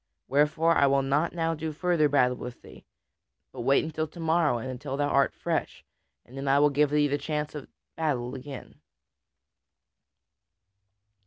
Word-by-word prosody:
Wherefore 155 +4 +2
I 140 - +4
will 135 0 +2
not 145 +5 +1
now 165 -1 -1
do 160 0 -4
further 155 -1 +1
battle 125 -3 +3
with 125 -1 -9
thee. - - -15 0.6
But - - -7
wait 135 +3 +3
until 155 0 -3
to 165 - -14
morrow 160 -5 +2
and 120 - -6
until 135 +2 -5
thou 145 0 0
art 140 -1 +3
fresh, - - -3 0.4
and 125 - -15
then 135 +1 -5
I 135 +1 +4
will 145 +1 +4
give 145 +1 +2
thee 150 0 +2
the 145 +1 -1
chance 150 -1 -3
of 150 -3 -7 0.3
battle 130 -6 -2
again." 135 0 -9
145 Hz, 165 wpm, -27 LUFS, 135-155 Hz, 0.6 s, I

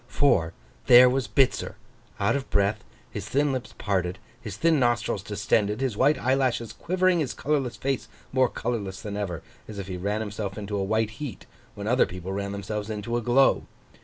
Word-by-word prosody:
For, 90 -13 +2 0.3
there 125 +1 +9
was 130 -2 0
Bitzer, 125 +6 +1 0.4
out - - +2
of 140 -1 -3
breath, 100 0 +1 0.3
his 105 +1 -6
thin 145 +1 +2
lips 130 -2 -5
parted, 95 -2 -1 0.2
his 105 -4 -7
thin 165 +1 +3
nostrils 120 -5 +1
distended, 105 +1 0
his 130 -5 -1
white 140 +7 +3
eyelashes 130 -3 0
quivering, 185 +1 +1
his 145 -6 -2
colourless 135 -5 -1
face 135 -1 -2 0.3
more 130 -2 +3
colourless 100 -6 -3
than 105 -1 -5
ever, 95 -6 -4 0.2
as 105 - -8
if 100 -2 -5
he 90 -1 -4
ran 100 +4 -1
himself 105 -1 -4
into 105 0 -4
a 100 - 0
white 110 +2 0
heat, 145 -6 -6 0.3
when 100 - -6
other 125 +4 +3
people 90 +1 -6
ran 100 0 -3
themselves 105 +1 -4
into 110 +2 -3
a 120 - 0
glow. 125 +3 +3
110 Hz, 185 wpm, -26 LUFS, 100-130 Hz, 0.4 s, there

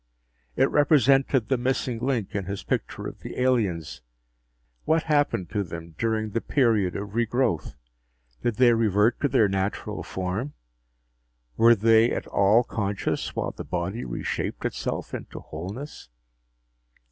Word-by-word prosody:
It 135 - +4
represented 135 -4 +4
the 130 0 +1
missing 125 -1 -1
link 120 -5 -1
in 100 -2 -2
his 100 +1 -5
picture - - -3
of - - -7
the - - -7
aliens. 105 - 0 0.8
What 160 0 +2
happened 145 - +1
to 105 - 0
them 85 -2 -8
during 110 0 -1
the 115 - -1
period 110 - +2
of 100 0 -5
regrowth? 115 - 0 0.7
Did 120 -2 0
they 120 +1 +5
revert 110 0 +2
to 145 - +3
their 125 -5 +3
natural 95 +1 -2
form? 95 +10 -4 1.0
Were 115 +1 +6
they 115 +2 +5
at - - -2
all 105 +5 +4
conscious 100 -4 -2
while - - -2
the - - -8
body 90 +8 -3
reshaped - - -4
itself - - -3
into - - -6
wholeness? 95 - -8
110 Hz, 135 wpm, -25 LUFS, 95-125 Hz, 1.0 s, Were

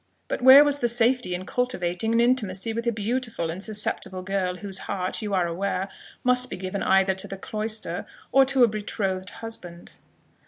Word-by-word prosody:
But - - -3
where 260 +3 +10
was 290 -1 +1
the 240 - +1
safety 240 -4 +1
in 185 +1 -6
cultivating 220 -5 -1
an 230 - +3
intimacy 225 -4 +1
with 230 +1 -3
a - - +3
beautiful 225 -5 -2
and 185 +4 -6
susceptible 205 -3 -2
girl, 185 -1 -1
whose 195 0 -5
heart, 185 +1 -1
you 205 -2 -2
are 180 -2 +2
aware, 185 +2 -2 0.3
must 250 0 +2
be - - -5
given 185 +1 -4
either 190 0 +3
to 190 - 0
the 195 - -7
cloister 215 +2 -3 0.2
or 270 - +6
to 265 -1 +4
a - - +7
betrothed 200 -3 -3
husband?" 180 -8 -8
205 Hz, 185 wpm, -25 LUFS, 185-240 Hz, 0.3 s, where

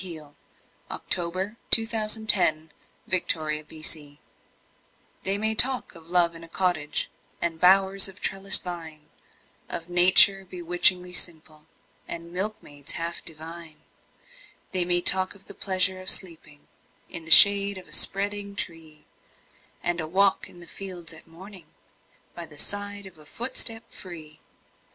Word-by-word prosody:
Nathaniel 155 -5 -10 0.5
Parker 175 -2 -3
Willis 215 +5 +2
Love 215 0 0
in 220 - -11
a 175 -2 0
Cottage 155 -1 -3 1.0
THEY 195 +1 0
may 220 +1 -1
talk 255 +3 +5
of 165 -2 -16
love 170 -1 +1
in 165 0 -12
a - - -13
cottage 165 -4 -3 0.3
And 165 -1 -4
bowers 190 +2 +3
of 190 0 -13
trellised 195 +1 0
vine 160 -4 -10 0.6
Of 170 +1 -7
nature 185 +2 +7
bewitchingly 180 0 0
simple, 155 -3 -5 0.4
And 170 0 -9
milkmaids 180 -7 -5
half 170 0 -6
divine; 160 0 -12 0.9
They 185 -2 +2
may 175 0 +6
talk 185 +2 +1
of 195 - -18
the - - -11
pleasure 190 -1 0
of 185 - +1
sleeping 160 -5 -3 0.4
In 165 - -4
the - - -8
shade 200 +2 +6
of 185 - -13
a - - -13
spreading 200 0 -1
tree, 165 -5 -7 0.8
And 175 -1 -2
a 155 - -7
walk 195 +4 0
in 175 - -16
the - - -12
fields 180 -3 -9
at 160 - -16
morning, 180 +1 -14 0.7
By 170 -1 -9
the 150 - -16
side 205 +4 -3
of 180 -4 -15
a 150 - -17
footstep 230 0 -4
free! 155 -5 -11
175 Hz, 140 wpm, -24 LUFS, 160-195 Hz, 1.0 s, nature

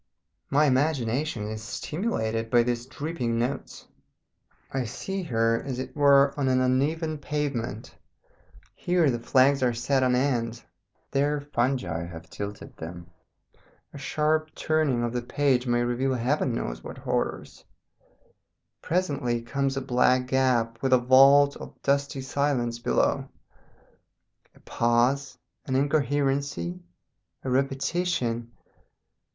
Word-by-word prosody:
My 145 +2 +4
imagination 130 -3 0
is 110 0 -5
stimulated 115 - -3
by 120 0 +4
these 120 0 -2
dripping 130 -5 -3
notes. 125 +4 -3 0.9
I 135 -1 -1
see 195 - -4
her, 115 -7 +1
as 130 -3 -5
it 130 - -6
were, 140 -1 +5
on 135 - +1
an 130 0 +3
uneven 150 +5 0
pavement; 140 -7 -3 0.8
here 175 -5 +2
the 120 - -2
flags 135 +3 +3
are 125 -2 +2
set 130 +3 +1
on 125 -1 +3
end, 120 -3 -1 0.5
there 145 +2 +1
fungi 120 - -1
have 80 -1 -11
tilted 100 0 -7
them, 85 +1 -9 0.8
a - - -8
sharp 155 +2 0
turning 155 -6 +1
of 120 0 -2
the 125 - -1
page 130 0 +1
may 120 0 +2
reveal 130 +2 0
heaven 130 +2 0
knows - - -4
what - - -8
horrors; - - -3 1.2
presently 140 -9 -1
comes 135 +3 -1
a - - -1
black 125 0 +2
gap 125 -3 +1
with 130 -1 +2
a - - +8
vault 135 +3 +6
of - - -11
dusty 140 -1 0
silence 130 -4 -1
below. - - 0 1.3
A - - -19
pause, 120 +4 +1 0.3
an 130 - -1
incoherency, 145 +4 0 0.6
a 130 - -3
repetition! 135 -3 -1
130 Hz, 125 wpm, -26 LUFS, 120-145 Hz, 1.3 s, a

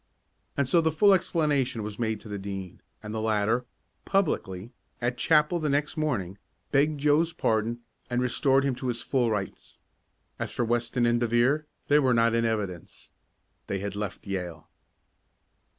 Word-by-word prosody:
And 140 -2 +2
so 165 +6 +4
the 160 0 +2
full 200 +6 +5
explanation 145 - +1
was 105 +1 -6
made 110 -2 -1
to - - -12
the 105 -1 -5
Dean, 95 -2 -6 0.2
and 105 0 -6
the 110 - -2
latter, 110 +2 +1 0.4
publicly, 120 - -1 0.3
at 120 +1 -1
chapel 150 +6 +3
the 155 -2 -1
next 145 +2 0
morning, 100 - -2 0.3
begged 145 +1 +2
Joe's 150 +3 +3
pardon, 115 0 0 0.3
and 120 0 0
restored 135 +2 +2
him 140 -1 +1
to 130 - -4
his 120 -2 -2
full 125 -4 +1
rights. 105 -3 -4 0.6
As - - -3
for 120 - -1
Weston 120 +1 +1
and 120 0 +3
De 120 - +1
Vere, 130 +7 +2 0.2
they 145 +1 +5
were 130 -4 +3
not 115 0 +3
in 115 0 +2
evidence. 100 -7 -4 0.6
They 100 - -1
had 100 0 -4
left 100 -1 -5
Yale. 90 -4 -5
120 Hz, 165 wpm, -27 LUFS, 105-145 Hz, 0.6 s, full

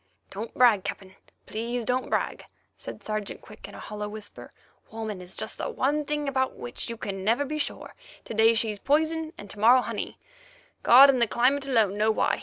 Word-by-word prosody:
"Don't 215 +4 -6
brag, 230 -6 +5
Captain. 190 -1 -6 0.3
Please 235 +2 -3
don't 255 +2 -1
brag," - - -1 0.3
said - - -9
Sergeant 215 -1 -4
Quick - - -12
in - - -12
a - - -9
hollow 210 0 -6
whisper. 210 -1 -10 0.4
"Woman 220 -3 -5
is 180 +1 -10
just - - -5
the - - -2
one 300 - 0
thing 295 0 -2
about 260 -1 0
which 120 - -5
you 230 - -5
can 195 -3 -5
never 230 +8 +2
be 305 +2 -4
sure. - - -5 0.3
To - - -6
day 225 +1 +5
she's 220 -2 -1
poison, 315 +4 +1
and 205 - -9
to 205 - -7
morrow 245 +4 +6
honey—God - - +2
and 255 -3 -1
the 235 - +4
climate 270 +5 +2
alone 215 -6 +2
know 215 +1 +3
why. 220 - +1
230 Hz, 195 wpm, -26 LUFS, 210-275 Hz, 0.4 s, morrow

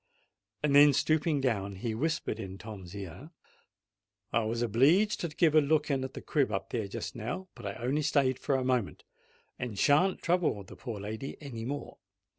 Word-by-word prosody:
Then, 145 0 +7
stooping 155 +1 +2
down, 100 -6 -1
he 110 +4 -3
whispered 150 -2 -1
in 95 -3 -6
Tom's 100 -3 -9
ear, 100 - -8 1.0
"I 115 - +3
was 115 +2 -1
obleeged 150 - +4
to 170 - -1
give 155 0 +2
a 155 - +7
look 150 +1 +1
in 135 -1 0
at 130 - -6
the - - -7
crib 145 -3 +1
up - - -3
there 110 -4 -2
just 100 - -5
now; 150 - -5
but 120 -5 -8
I 100 - -3
only 130 +5 -1
stayed 140 -3 +2
a 135 -2 +3
moment, 125 -5 -1 0.6
and 120 -5 -4
shan't 155 - +4
trouble 170 - +1
the 95 - -12
poor 115 -5 -6
lady 110 +6 -5
any 120 -6 -6
more. 140 +3 -5
130 Hz, 180 wpm, -30 LUFS, 110-150 Hz, 1.0 s, Then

